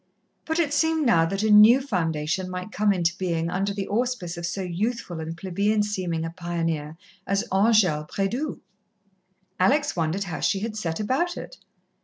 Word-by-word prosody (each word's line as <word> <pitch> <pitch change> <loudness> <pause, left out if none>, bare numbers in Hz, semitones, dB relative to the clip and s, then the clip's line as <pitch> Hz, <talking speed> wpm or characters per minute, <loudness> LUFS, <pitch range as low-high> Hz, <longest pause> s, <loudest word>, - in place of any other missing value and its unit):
But 320 0 -1
it 310 -4 +1
seemed 320 +1 +2
now 165 -9 +4
that 195 +4 -2
a 220 - +2
new 215 +5 +8
foundation 165 - -2
might 185 +2 -6
come 210 -1 +2
into 175 -3 +1
being 170 -2 -1
under 195 +2 -1
the 200 -1 -4
auspice 225 -6 -2
of 170 0 -4
so 190 +2 -3
youthful 185 0 -3
and 160 +1 -5
plebeian 200 +4 0
seeming 180 -6 -2
a 165 - -4
pioneer 165 -3 -3 0.3
as 200 +4 0
Angèle 190 -7 +3
Prédoux. 240 +10 -2 1.0
Alex 290 +10 +2
wondered 170 +3 -1
how 175 -4 -5
she 195 - 0
had 220 0 -4
set 170 -5 -3
about 270 +12 0
it. - - -9
195 Hz, 170 wpm, -25 LUFS, 170-220 Hz, 1.0 s, new